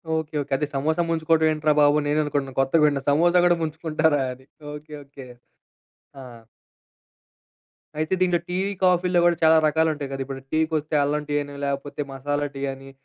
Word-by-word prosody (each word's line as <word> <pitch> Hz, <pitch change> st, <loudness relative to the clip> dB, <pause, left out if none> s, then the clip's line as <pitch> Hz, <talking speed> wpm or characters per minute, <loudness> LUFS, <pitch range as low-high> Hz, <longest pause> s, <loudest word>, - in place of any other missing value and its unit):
Okay, 160 Hz, -1 st, -4 dB
okay. 140 Hz, -, -5 dB
అదే 150 Hz, -, -2 dB
సమోసా 155 Hz, +5 st, 0 dB
ముంచుకోవడం 160 Hz, -1 st, +2 dB
ఏంట్రా 155 Hz, 0 st, +1 dB
బాబు 145 Hz, 0 st, +5 dB
అని 145 Hz, -, -3 dB
నేను 155 Hz, +1 st, +2 dB
అనుకుంటున్నాను. 140 Hz, -3 st, -3 dB
కొత్తగా 145 Hz, +4 st, +2 dB
వింటన్నా 140 Hz, -2 st, 0 dB
సమోసా 170 Hz, +5 st, +3 dB
కూడా 175 Hz, -1 st, +3 dB
ముంచుకుంటారా 160 Hz, -1 st, 0 dB
అని. 130 Hz, +1 st, -18 dB, 0.3 s
ఓకె. 150 Hz, +1 st, -11 dB
ఓకె. 135 Hz, -2 st, -13 dB, 0.9 s
ఆ! -, -, -9 dB, 1.8 s
అయితే 155 Hz, +4 st, -1 dB
దీంట్లో 180 Hz, -2 st, +2 dB
టీ, 180 Hz, -, -3 dB, 0.3 s
కాఫీలో 180 Hz, -1 st, +3 dB
కూడా 175 Hz, -1 st, +4 dB
చాలా 160 Hz, 0 st, +6 dB
రకాలు 160 Hz, +1 st, +2 dB
ఉంటాయి 145 Hz, -2 st, -6 dB
కదా! 135 Hz, 0 st, -4 dB
ఇప్పుడు 135 Hz, 0 st, -7 dB
టీకి 160 Hz, +1 st, 0 dB
వస్తే 155 Hz, +1 st, -4 dB
అల్లం 150 Hz, +1 st, -1 dB
టీ 145 Hz, -, -1 dB
అని 145 Hz, 0 st, -8 dB
లేకపోతే 140 Hz, +1 st, -4 dB
మసాలా 145 Hz, +2 st, -2 dB
టీ 135 Hz, -, -6 dB
అని 135 Hz, 0 st, -13 dB
150 Hz, 175 wpm, -23 LUFS, 140-160 Hz, 1.8 s, చాలా